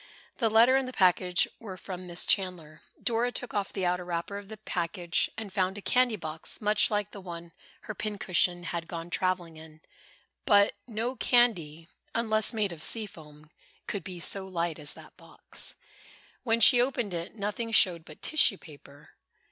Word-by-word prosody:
The 230 Hz, -3 st, +1 dB
letter 230 Hz, +4 st, +5 dB
and 265 Hz, -1 st, +1 dB
the 255 Hz, -, -7 dB
package 180 Hz, -2 st, +3 dB
were 195 Hz, -5 st, -8 dB
from 185 Hz, -1 st, -8 dB
Miss 175 Hz, 0 st, -2 dB
Chandler. 170 Hz, -5 st, -1 dB, 0.2 s
Dora 240 Hz, +1 st, +1 dB
took 245 Hz, 0 st, -4 dB
off 200 Hz, -2 st, -2 dB
the 190 Hz, -, -2 dB
outer 180 Hz, 0 st, 0 dB
wrapper 175 Hz, +3 st, -4 dB
of 200 Hz, -, -13 dB
the 220 Hz, -, -8 dB
package 175 Hz, -3 st, -1 dB
and 215 Hz, -4 st, -7 dB
found 190 Hz, 0 st, 0 dB
a -, -, -6 dB
candy 250 Hz, -2 st, +2 dB
box, 160 Hz, -4 st, -6 dB
much 210 Hz, 0 st, +3 dB
like 210 Hz, -1 st, -1 dB
the 200 Hz, -, -9 dB
one 170 Hz, -2 st, -8 dB, 0.3 s
her 215 Hz, -, -7 dB
pincushion 185 Hz, -4 st, +1 dB
had 170 Hz, -1 st, -4 dB
gone 170 Hz, 0 st, -7 dB
traveling 180 Hz, -4 st, -1 dB
in. 155 Hz, 0 st, -13 dB, 0.7 s
But 205 Hz, -4 st, +5 dB
no 235 Hz, +3 st, -3 dB
candy, 175 Hz, -13 st, +1 dB, 0.3 s
unless 220 Hz, -2 st, +2 dB
made 215 Hz, -5 st, -1 dB
of 165 Hz, -3 st, -9 dB
sea 220 Hz, +6 st, +1 dB
foam, 150 Hz, -4 st, -15 dB, 0.3 s
could 200 Hz, -4 st, -4 dB
be 180 Hz, 0 st, -8 dB
so 190 Hz, +2 st, -1 dB
light 170 Hz, -3 st, -2 dB
as 150 Hz, -1 st, 0 dB
that -, -, -14 dB
box. -, -, -6 dB, 0.7 s
When 230 Hz, -2 st, +1 dB
she 245 Hz, 0 st, +8 dB
opened 245 Hz, -6 st, -1 dB
it, 170 Hz, +4 st, -5 dB
nothing 215 Hz, +2 st, -3 dB
showed 180 Hz, -7 st, +5 dB
but 155 Hz, -1 st, -14 dB
tissue 290 Hz, -10 st, +4 dB
paper. 145 Hz, -3 st, -16 dB
190 Hz, 175 wpm, -28 LUFS, 170-220 Hz, 0.7 s, she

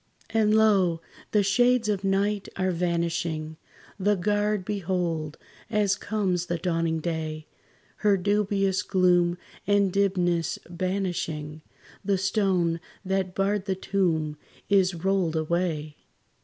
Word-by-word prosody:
And 215 Hz, -1 st, +3 dB
lo! 195 Hz, -6 st, +4 dB, 0.3 s
the 210 Hz, -1 st, +3 dB
shades 245 Hz, +3 st, +3 dB
of 200 Hz, -2 st, -1 dB
night 200 Hz, +1 st, 0 dB
are 185 Hz, -1 st, 0 dB
vanishing; 170 Hz, -2 st, -1 dB, 0.4 s
The 205 Hz, +2 st, +3 dB
guard 205 Hz, +1 st, 0 dB
behold, 175 Hz, -6 st, -2 dB, 0.3 s
as 205 Hz, -2 st, +2 dB
comes 195 Hz, -5 st, -1 dB
the 175 Hz, -, -1 dB
dawning 165 Hz, -2 st, -1 dB
day, 155 Hz, -2 st, -3 dB, 0.5 s
Her 205 Hz, -2 st, +3 dB
dubious 195 Hz, -1 st, +1 dB
gloom 180 Hz, -2 st, +2 dB, 0.3 s
and 200 Hz, -2 st, +3 dB
dimness 175 Hz, -4 st, +1 dB
banishing, 170 Hz, -4 st, -3 dB, 0.4 s
The 200 Hz, 0 st, +1 dB
stone 185 Hz, -4 st, +1 dB, 0.3 s
that 190 Hz, -1 st, -1 dB
barred 195 Hz, 0 st, 0 dB
the 190 Hz, -1 st, -1 dB
tomb 165 Hz, -6 st, 0 dB, 0.3 s
is 190 Hz, -2 st, +3 dB
rolled 180 Hz, -1 st, 0 dB
away. 155 Hz, -2 st, -1 dB
185 Hz, 115 wpm, -26 LUFS, 170-200 Hz, 0.5 s, lo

